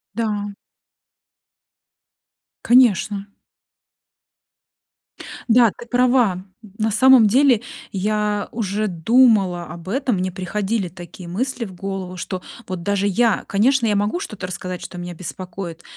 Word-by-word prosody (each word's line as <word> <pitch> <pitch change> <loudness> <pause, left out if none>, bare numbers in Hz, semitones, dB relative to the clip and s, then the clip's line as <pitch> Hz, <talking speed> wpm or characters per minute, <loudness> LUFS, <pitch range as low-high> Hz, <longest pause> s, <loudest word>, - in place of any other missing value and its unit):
Да. 210 -3 -2 2.1
Конечно. 210 -5 +3 2.2
Да, 230 -1 +5
ты 235 - -10
права. 245 -7 +2 0.3
На 220 -1 0
самом 255 0 +6
деле 250 0 +4 0.3
я 210 +1 -1
уже 215 -1 -2
думала 195 -1 +3
об 170 +2 -9
этом. 260 +1 0
Мне 185 0 -2
приходили 195 +2 -2
такие 175 0 -11
мысли 235 +7 -3
в 190 - -10
голову, 190 0 -5
что 185 +1 -5 0.3
вот 185 -2 -5
даже 200 +1 0
я 225 +2 +2
конечно, 235 +5 +2
я 210 - +2
могу 205 - 0
что-то 215 - -6
рассказать, 180 0 -6
что 180 - -8
меня 175 0 -6
беспокоит, 180 -1 -7
205 Hz, 115 wpm, -21 LUFS, 185-230 Hz, 2.2 s, самом